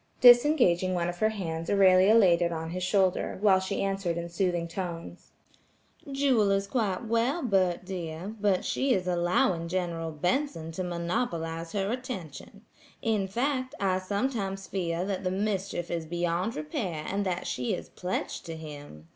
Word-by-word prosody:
Disengaging 240 - +6
one 175 0 0
of 175 0 -6
her 215 - +3
hands, 165 -6 -4
Aurelia 195 +1 +6
laid 180 -6 +5
it 170 0 +1
on 160 0 -4
his 185 +1 -4
shoulder, 185 0 +1
while 195 -2 +5
she 190 +1 -2
answered 195 -3 -1
in 170 0 -4
soothing 175 -1 0
tones: 170 -1 -6 0.8
"Jewel 270 -7 +3
is 195 0 +2
quite 210 -3 -1
well, 235 +8 +1
Bert 185 -6 +1
dear, 180 +1 -5
but 200 -3 +2
she 265 -2 +1
is 185 -1 -2
allowing 175 -1 +1
General 170 -2 -2
Benson 165 - -1
to 185 +3 -4
monopolize 170 -2 -2
her 200 0 0
attention; 200 - -6 0.4
in 215 -4 +1
fact, 255 +6 -1
I 185 -2 +1
sometimes 195 -1 -2
fear 175 -2 -2
that 195 -1 -3
the 185 - 0
mischief 195 -2 -2
is 165 -2 -3
beyond 175 +5 -1
repair 155 +1 -3
and 200 +1 -1
that 180 -1 -2
she 125 -1 -1
is - - -8
pledged 180 +1 -4
to 165 - -5
him. 145 - -10
185 Hz, 160 wpm, -28 LUFS, 170-205 Hz, 0.8 s, Disengaging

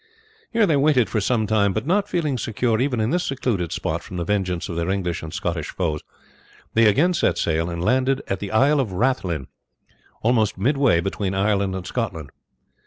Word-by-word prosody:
Here 230 -2 +3
they 160 -6 +2
waited 140 -4 +3
for 110 - 0
some 110 +1 +1
time, 100 -2 +2
but - - -2
not 200 +5 +1
feeling 160 -7 0
secure 115 +1 0
even 130 -3 0
in 110 +3 0
this 180 +1 +1
secluded 110 - -1
spot - - -2
from 90 - -8
the 85 - -1
vengeance 90 -2 -1
of 85 - -5
their 85 +1 -1
English 90 -3 -1
and 80 - -7
Scottish 85 -2 -3
foes, 80 -5 -2 0.7
they 115 0 +5
again 155 - +3
set 85 - +1
sail 80 0 0
and 85 0 -4
landed 130 +3 +2
at 95 - -2
the 100 - -5
Isle 140 +7 +4
of 120 -7 -1
Rathlin, 90 - 0 0.8
almost 110 -3 +2
midway 130 - +2
between 95 +1 -2
Ireland 100 -1 +1
and 95 -1 -5
Scotland. 90 - -4
105 Hz, 190 wpm, -22 LUFS, 90-130 Hz, 0.8 s, they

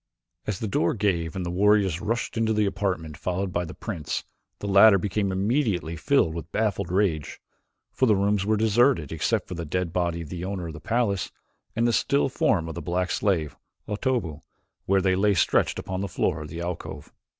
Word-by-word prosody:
As 105 -4 -1
the 110 - -3
door 85 -4 +1
gave 85 -6 0
and 95 -2 -3
the 85 - -3
warriors 100 -2 +3
rushed 115 +2 -2
into 110 -1 +1
the 105 -1 +2
apartment 95 -6 -2
followed 95 0 -2
by 85 0 0
the 80 - -9
prince, 85 -10 -4 0.3
the - - -8
latter 100 +1 +7
became 100 +1 -1
immediately 95 - 0
filled 110 - +2
with 85 -1 -7
baffled 100 -4 -1
rage, 90 -6 0 0.5
for 130 - +2
the 105 - +5
rooms 100 0 +1
were 110 +2 +1
deserted 110 - +3
except 80 - 0
for - - -6
the 85 -1 -4
dead 85 +2 -2
body 85 -2 0
of 75 - -11
the 90 0 -5
owner 95 -2 -3
of 80 - -6
the 75 - -9
palace, 105 0 0 0.4
and 115 +1 +2
the 120 - +2
still 140 +3 +2
form 95 -9 +1
of 80 - -5
the 85 - -6
black 90 +3 -1
slave, 80 -9 0 0.3
Otobu, 105 - -2 0.5
where 95 0 +3
they 95 0 +2
lay 100 +1 +3
stretched - - +2
upon 95 0 -4
the 100 - -2
floor - - -1
of 75 - -7
the 85 +1 -6
alcove. 85 -1 -6
95 Hz, 200 wpm, -25 LUFS, 85-105 Hz, 0.5 s, latter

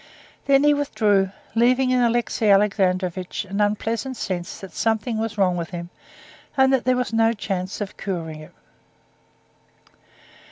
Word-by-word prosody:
Then 275 0 +4
he 295 0 +5
withdrew, 210 -9 +1 0.2
leaving 250 +3 +3
in 250 -1 +3
Alexey 235 -2 +1
Alexandrovitch 190 -2 +1
an 195 +2 -2
unpleasant 225 +5 -1
sense 180 -4 -4
that 195 - -10
something 220 +1 -1
was 225 -1 -3
wrong 185 -3 +2
with 170 -1 -4
him, 175 -1 -7 0.7
and 265 0 +5
that 265 - +1
there 255 -1 +3
was 250 -2 -2
no 225 0 +3
chance 195 -2 -4
of 205 - -5
curing 165 -5 -4
it. 155 - -13
210 Hz, 145 wpm, -23 LUFS, 185-240 Hz, 0.7 s, he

